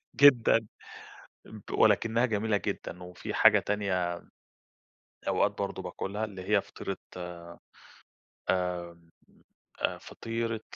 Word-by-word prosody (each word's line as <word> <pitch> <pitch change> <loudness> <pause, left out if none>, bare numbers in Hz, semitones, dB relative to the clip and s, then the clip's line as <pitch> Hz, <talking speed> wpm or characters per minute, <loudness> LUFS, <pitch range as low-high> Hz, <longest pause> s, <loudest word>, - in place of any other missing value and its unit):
جدًا 120 -5 +6 1.1
ولكنها 115 +2 +4
جميلة 110 -1 +1
جدًا. 90 -2 -4
وفي 90 -1 -7
حاجة - - +7
تانية 95 -4 -1 1.1
أوقات - - +3
برضو - - -3
باكلها 105 +3 -3
اللي 95 -2 -8
هي 105 -2 +5
فطيرة 95 - -6 0.2
آآ، 85 -1 -8 0.9
آآ 85 -2 -2 0.7
فطيرة 115 -1 -4
100 Hz, 90 wpm, -30 LUFS, 90-110 Hz, 1.1 s, حاجة